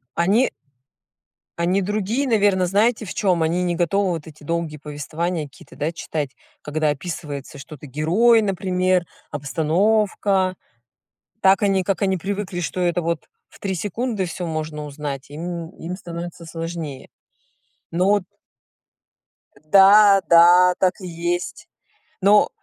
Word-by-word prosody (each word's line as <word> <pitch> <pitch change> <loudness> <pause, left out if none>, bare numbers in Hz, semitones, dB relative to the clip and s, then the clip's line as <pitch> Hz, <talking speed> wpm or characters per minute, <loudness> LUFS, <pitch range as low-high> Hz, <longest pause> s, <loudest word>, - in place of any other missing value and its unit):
Они 200 +9 +3 1.1
Они 180 +3 +2
другие, 215 +7 -1
наверно, 205 -5 +3
знаете 220 +5 +2
в 185 - -7
чём? 180 -4 +1
Они 165 +3 +1
не 175 -1 0
готовы 185 +3 +1
вот 165 -3 -5
эти 155 -1 -14
долгие 165 0 -3
повествования 155 +3 -4
какие-то, 140 - -16
да, 155 +3 -2
читать, 155 -3 -4 0.3
когда 155 +1 -1
описывается, 145 -2 -6
что 140 +2 -10
это 145 +1 -12
герой, 195 - +3
например, 185 -2 0 0.3
обстановка. 185 +6 +1 0.9
Так 195 +1 +4
они, 195 -2 +2
как 195 +2 -1
они 190 -1 +2
привыкли, 195 0 -4
что 175 +1 -3
это 175 -1 +1
вот 165 -1 -3 0.2
в - - -19
3 195 -1 -2
секунды 210 +3 -2
всё 175 0 -5
можно 155 -1 -4
узнать, 140 -2 -6
им 170 +2 -5
им 175 +3 -6
становится 170 -1 -8
сложнее. 165 -4 -6 0.8
Но 180 +3 +1
вот 205 -2 +2 1.4
Да, 200 +3 +7
да, 175 +2 +7
так 185 -1 +3
и 185 - -6
есть. 175 +1 -3 0.5
Но 205 +2 +5
175 Hz, 135 wpm, -22 LUFS, 160-195 Hz, 1.4 s, Да